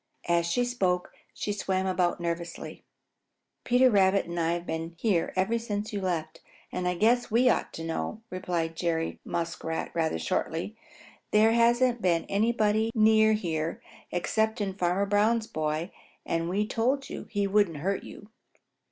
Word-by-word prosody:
As 170 Hz, -1 st, +2 dB
she 245 Hz, +8 st, +1 dB
spoke 185 Hz, -7 st, -1 dB, 0.2 s
she 205 Hz, -, -3 dB
swam 190 Hz, -2 st, -1 dB
about 180 Hz, -2 st, +1 dB
nervously. 170 Hz, 0 st, -5 dB, 0.8 s
"Peter 250 Hz, +1 st, +4 dB
Rabbit 195 Hz, -1 st, +4 dB
and 170 Hz, 0 st, -4 dB
I 165 Hz, 0 st, +1 dB
have 175 Hz, 0 st, -4 dB
been 165 Hz, +1 st, -4 dB
here 185 Hz, -4 st, +1 dB
ever 195 Hz, +5 st, +1 dB
since 215 Hz, -1 st, -4 dB
you 200 Hz, -, -2 dB
left, 165 Hz, -4 st, -3 dB, 0.3 s
and 180 Hz, -, -2 dB
I 180 Hz, -, 0 dB
guess 235 Hz, +6 st, +2 dB
we 240 Hz, +3 st, +4 dB
ought -, -, -1 dB
to 165 Hz, -, -6 dB
know," 165 Hz, +7 st, -4 dB
replied 175 Hz, -3 st, -2 dB
Jerry 165 Hz, -1 st, -1 dB
Muskrat 165 Hz, -1 st, -3 dB
rather 160 Hz, -, 0 dB
shortly. 160 Hz, -, -2 dB, 0.5 s
"There 215 Hz, +1 st, +5 dB
hasn't 235 Hz, +1 st, +3 dB
been 175 Hz, -3 st, +2 dB
anybody 220 Hz, +1 st, +2 dB
near 220 Hz, 0 st, +5 dB
here 165 Hz, -6 st, -2 dB, 0.3 s
excepting 210 Hz, +2 st, 0 dB
Farmer 185 Hz, +1 st, +1 dB
Brown's 215 Hz, +3 st, +2 dB
boy, 155 Hz, 0 st, -2 dB, 0.3 s
and 165 Hz, 0 st, -1 dB
we 200 Hz, +3 st, +1 dB
told 260 Hz, +6 st, 0 dB
you -, -, -7 dB
he 205 Hz, -2 st, 0 dB
wouldn't 200 Hz, -5 st, +2 dB
hurt 190 Hz, +6 st, -1 dB
you." 210 Hz, +1 st, -12 dB
190 Hz, 150 wpm, -28 LUFS, 170-220 Hz, 0.8 s, There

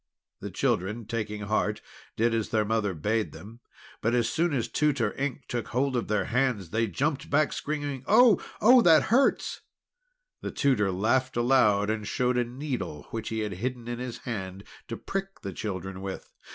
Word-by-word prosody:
The -, -, -6 dB
children, 105 Hz, +5 st, -1 dB
taking 105 Hz, -2 st, -3 dB
heart, 105 Hz, 0 st, 0 dB, 0.4 s
did 115 Hz, +1 st, +2 dB
as 115 Hz, -2 st, -1 dB
their 110 Hz, -1 st, +1 dB
mother 105 Hz, -3 st, 0 dB
bade 105 Hz, +7 st, -1 dB
them. 110 Hz, +4 st, -11 dB, 0.4 s
But 115 Hz, +2 st, +1 dB
as 120 Hz, -2 st, +2 dB
soon 170 Hz, +1 st, +1 dB
as 130 Hz, -5 st, 0 dB
Tutor 135 Hz, -8 st, +1 dB
Ink 140 Hz, 0 st, -3 dB
took 120 Hz, -2 st, -3 dB
hold 130 Hz, +2 st, 0 dB
of 120 Hz, -, -1 dB
their 105 Hz, -1 st, +1 dB
hands, 120 Hz, -7 st, 0 dB
they 115 Hz, +1 st, +1 dB
jumped 140 Hz, -, -1 dB
back, 150 Hz, +1 st, +2 dB
screaming: 145 Hz, -3 st, -3 dB
"Oh! 225 Hz, 0 st, +6 dB, 0.2 s
Oh! 245 Hz, +3 st, +8 dB
It 160 Hz, -4 st, +6 dB
hurts!" 250 Hz, -, +2 dB, 0.8 s
The -, -, -3 dB
tutor 110 Hz, -8 st, +2 dB
laughed 120 Hz, +7 st, +1 dB
aloud, 110 Hz, -5 st, +3 dB
and 105 Hz, -2 st, -3 dB
showed 125 Hz, +2 st, +1 dB
a -, -, +3 dB
needle, 125 Hz, -, -5 dB
which 110 Hz, -1 st, -4 dB
he 110 Hz, 0 st, -2 dB
had 105 Hz, -2 st, -3 dB
hidden 125 Hz, -1 st, -3 dB
in 120 Hz, 0 st, -4 dB
his 125 Hz, -1 st, -5 dB
hand 95 Hz, -4 st, -5 dB, 0.2 s
to -, -, -5 dB
prick 195 Hz, 0 st, -5 dB
the 100 Hz, -2 st, -5 dB
children 95 Hz, -2 st, -5 dB
with. 95 Hz, -1 st, -7 dB
115 Hz, 180 wpm, -27 LUFS, 105-135 Hz, 0.8 s, Oh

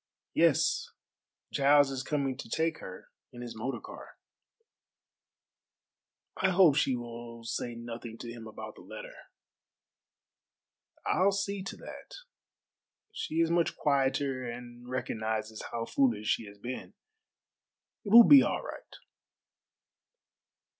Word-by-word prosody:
"Yes. -, -, +3 dB, 0.6 s
Giles 145 Hz, 0 st, +5 dB
is 130 Hz, -1 st, -3 dB
coming 135 Hz, -1 st, -1 dB
to 115 Hz, -, -8 dB
take 160 Hz, +5 st, 0 dB
her 95 Hz, 0 st, -10 dB, 0.2 s
in 120 Hz, 0 st, -9 dB
his 120 Hz, -, -7 dB
motor 125 Hz, +5 st, -3 dB
car." -, -, -11 dB, 2.2 s
"I 190 Hz, -, +2 dB
hope 180 Hz, -6 st, +6 dB
she 135 Hz, -3 st, +2 dB
will 120 Hz, -1 st, -8 dB
say 120 Hz, +1 st, -3 dB
nothing 115 Hz, -1 st, -7 dB
to 120 Hz, -, -7 dB
him 115 Hz, -1 st, -9 dB
about 110 Hz, -, -8 dB
the -, -, -15 dB
letter." -, -, -9 dB, 1.9 s
"I'll 195 Hz, +2 st, +3 dB
see 200 Hz, 0 st, -2 dB
to 195 Hz, -, -6 dB
that. -, -, -10 dB, 1.0 s
She 160 Hz, +1 st, -2 dB
is 165 Hz, 0 st, +2 dB
much 170 Hz, -1 st, +2 dB
quieter 135 Hz, -2 st, +1 dB
and 120 Hz, 0 st, -8 dB
recognizes 110 Hz, -3 st, -3 dB
how 115 Hz, -1 st, -3 dB
foolish 115 Hz, -5 st, +1 dB
she 115 Hz, -, 0 dB
has 100 Hz, 0 st, -12 dB
been. 125 Hz, -, -7 dB, 1.1 s
It 205 Hz, -, -5 dB
will 235 Hz, +1 st, +10 dB
be 280 Hz, -2 st, +10 dB
all -, -, -1 dB
right." -, -, -9 dB
130 Hz, 120 wpm, -30 LUFS, 115-160 Hz, 2.2 s, will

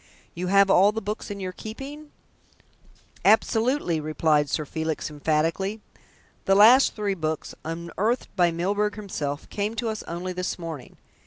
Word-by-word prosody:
"You 180 Hz, +1 st, -4 dB
have 195 Hz, +1 st, +5 dB
all 195 Hz, +3 st, +6 dB
the 220 Hz, -, -3 dB
books 210 Hz, +1 st, -5 dB
in 200 Hz, -1 st, -5 dB
your 185 Hz, -1 st, -4 dB
keeping?" 275 Hz, +10 st, -9 dB, 1.1 s
"Absolutely," 220 Hz, -, +2 dB
replied 155 Hz, -1 st, +1 dB
Sir 155 Hz, -, -1 dB
Felix 160 Hz, +1 st, -3 dB
emphatically. 165 Hz, +7 st, 0 dB, 0.7 s
"The 195 Hz, -, +4 dB
last 235 Hz, +7 st, +7 dB
three 205 Hz, -2 st, -1 dB
books, 160 Hz, -4 st, -3 dB
unearthed 170 Hz, +10 st, -2 dB
by 175 Hz, -3 st, +4 dB
Mr. 165 Hz, -, -5 dB
Milburgh 205 Hz, +4 st, 0 dB
himself, 150 Hz, -9 st, -4 dB
came 210 Hz, +2 st, -2 dB
to 230 Hz, 0 st, -2 dB
us 215 Hz, -1 st, -4 dB
only 175 Hz, +2 st, -4 dB
this 180 Hz, +1 st, -3 dB
morning. 165 Hz, -7 st, -8 dB
190 Hz, 150 wpm, -25 LUFS, 160-215 Hz, 1.1 s, last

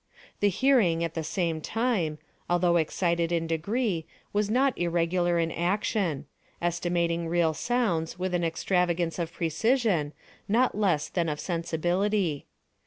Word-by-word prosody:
The 205 Hz, -, +4 dB
hearing, 195 Hz, -7 st, +3 dB
at 165 Hz, -1 st, -2 dB
the 165 Hz, -, -3 dB
same 165 Hz, 0 st, -1 dB
time, 210 Hz, -8 st, 0 dB, 0.3 s
although 175 Hz, 0 st, +3 dB
excited 170 Hz, +1 st, 0 dB
in 165 Hz, -1 st, 0 dB
degree, 170 Hz, +2 st, -1 dB, 0.3 s
was 205 Hz, 0 st, +1 dB
not 260 Hz, +3 st, +2 dB
irregular 175 Hz, 0 st, +1 dB
in 165 Hz, -1 st, 0 dB
action—estimating 175 Hz, -, -1 dB
real 165 Hz, -1 st, +2 dB
sounds 180 Hz, -7 st, -1 dB
with 185 Hz, 0 st, -2 dB
an 175 Hz, -1 st, +1 dB
extravagance 170 Hz, 0 st, 0 dB
of 170 Hz, -1 st, -2 dB
precision, 175 Hz, -, +1 dB, 0.4 s
not 245 Hz, +5 st, +3 dB
less 190 Hz, -8 st, +1 dB
than 170 Hz, -3 st, -1 dB
of 150 Hz, -1 st, -3 dB
sensibility. 175 Hz, 0 st, -1 dB
175 Hz, 125 wpm, -27 LUFS, 165-200 Hz, 0.4 s, The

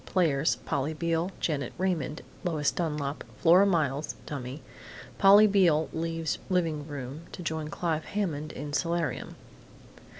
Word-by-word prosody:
Players: 160 Hz, -5 st, +2 dB
Polly 145 Hz, +4 st, -1 dB
Beale, 165 Hz, +2 st, 0 dB
Janet 145 Hz, -4 st, -1 dB
Raymond, 175 Hz, -5 st, -1 dB, 0.2 s
Lois 155 Hz, -5 st, +1 dB
Dunlap, 150 Hz, -4 st, -2 dB
Flora 180 Hz, +4 st, +6 dB
Miles 155 Hz, -5 st, 0 dB
(dummy). 135 Hz, 0 st, -6 dB, 0.6 s
Polly 200 Hz, +2 st, +8 dB
Beale 180 Hz, -7 st, +3 dB
leaves 165 Hz, -1 st, -2 dB
living 165 Hz, -5 st, 0 dB
room 145 Hz, +3 st, -7 dB
to 180 Hz, -, -7 dB
join 160 Hz, -1 st, -2 dB
Clive 160 Hz, 0 st, -2 dB
Hammond 155 Hz, -7 st, -2 dB
in 145 Hz, 0 st, -6 dB
solarium. 165 Hz, -2 st, -1 dB
160 Hz, 125 wpm, -28 LUFS, 150-175 Hz, 0.6 s, Polly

